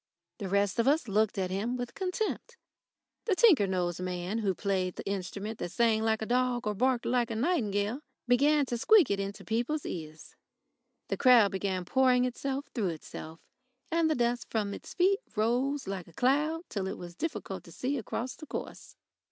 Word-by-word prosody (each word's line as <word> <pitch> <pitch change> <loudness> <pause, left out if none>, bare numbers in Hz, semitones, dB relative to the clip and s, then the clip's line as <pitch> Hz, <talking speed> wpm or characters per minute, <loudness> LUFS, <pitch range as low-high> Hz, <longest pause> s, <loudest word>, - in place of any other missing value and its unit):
The 195 - -4
rest 200 +2 +1
of 230 - +3
us 290 -1 +3
looked 215 +1 +1
at 185 -1 -1
him 220 +6 -1
with 245 -1 -5
contempt. 420 +5 -3 0.7
The 410 - +2
tinker 345 - +6
nosed 180 -2 -1
man 180 +3 -2
who 195 -4 0
played 185 -2 -1
the - - -7
instrument 200 +3 -4
that 175 - -4
sang 225 -2 +2
like 220 0 +1
a - - -2
dog 245 0 +1
or 210 - 0
barked 245 +3 +1
like 245 -1 +1
a 225 - -3
nightingale 220 - 0 0.3
began 285 +4 +4
to 240 -2 -3
squeak 405 - +5
it 200 - 0
into 195 +1 -5
people's 245 +7 -1
ears. 155 -2 -7 0.7
The - - -1
crowd 240 -6 +6
began 190 -2 -2
pouring 250 +3 +3
itself 270 +3 -3
through 220 -6 0
itself, 160 0 -8 0.5
and 330 -1 +3
the 310 - +2
dust 240 0 0
from 205 -3 -1
its - - -9
feet 390 +3 +3 0.2
rose 250 +5 0
like 190 -3 -4
a 170 - -16
cloud 300 - +1
till 195 -2 -3
it 190 - -4
was 175 -1 -8
difficult 205 - -4
to 170 - -13
see 250 - -2
across 240 +3 -4
the 310 - -11
course. - - -7
225 Hz, 185 wpm, -30 LUFS, 195-265 Hz, 0.7 s, tinker